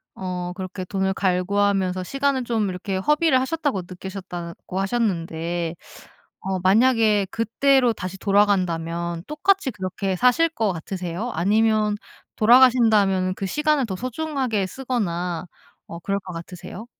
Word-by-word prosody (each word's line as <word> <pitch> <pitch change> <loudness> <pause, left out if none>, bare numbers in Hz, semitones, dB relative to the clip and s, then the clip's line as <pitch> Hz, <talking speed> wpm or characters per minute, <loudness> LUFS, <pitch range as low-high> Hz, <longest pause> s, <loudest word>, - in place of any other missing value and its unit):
어 180 -1 -4
그렇게 185 0 -6
돈을 190 0 -1
갈구하면서 190 0 +1
시간을 275 +4 0
좀 225 -4 0
이렇게 190 +1 -3
허비를 300 - +3
하셨다고 285 - -1
느끼셨다고 180 -1 -7
하셨는데 175 -5 -1 0.7
어 190 -1 -2
만약에 215 +1 +4
그때로 245 +2 +2
다시 185 -2 -6
돌아간다면 170 -5 +1
똑같이 305 0 +1
그렇게 190 -1 -3
사실 250 - +4
것 225 -10 -1
같으세요? 180 +6 -4
아니면 210 +3 +2 0.4
돌아가신다면은 220 -6 +5
그 195 - -4
시간을 300 +4 +1
더 190 - -3
소중하게 255 -3 -2
쓰거나 180 -9 -3 0.4
어 170 - -8
그럴 195 +3 -2
것 185 -1 -9
같으세요? 180 +5 -8
195 Hz, 320 characters per minute, -23 LUFS, 180-240 Hz, 0.7 s, 돌아가신다면은